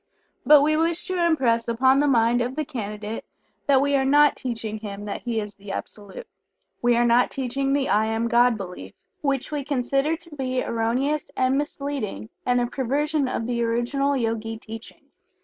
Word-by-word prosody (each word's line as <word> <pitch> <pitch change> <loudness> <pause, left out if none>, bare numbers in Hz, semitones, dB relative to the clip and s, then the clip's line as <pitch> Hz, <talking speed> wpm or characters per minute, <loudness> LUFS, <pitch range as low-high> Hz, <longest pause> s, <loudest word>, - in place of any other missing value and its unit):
But 295 -1 +8
we 310 +1 +2
wish 330 +2 0
to 365 -2 -1
impress 245 -9 +2
upon 260 +3 +3
the 290 - +3
mind 240 -2 +3
of 250 +2 -2
the 310 0 -2
Candidate 210 -3 -5 0.4
that 275 -2 +5
we 285 0 +2
are 270 - +3
not 290 +2 +5
teaching 225 -3 -4
him 205 -1 -7
that 205 - -5
he 235 -2 -1
is 210 -1 -5
the 200 0 -9
Absolute. 210 - -7 0.6
We 240 0 +3
are 240 - +3
not 240 +1 +4
teaching 270 +1 -2
the 280 -1 +1
"I 215 +1 +2
Am 225 +1 0
God" 240 0 +4
belief, 180 - -8 0.3
which 275 -1 -1
we 295 -2 -2
consider 275 +3 0
to 335 -2 -13
be 255 -2 -1
erroneous 250 +6 -1
and 255 +1 +2
misleading, 275 - -3 0.2
and 245 0 +3
a 245 - +1
perversion 280 +4 0
of 240 -3 -2
the 240 0 -1
original 245 +5 0
Yogi 225 -2 -2
teachings. 225 0 -12
250 Hz, 185 wpm, -24 LUFS, 225-280 Hz, 0.6 s, But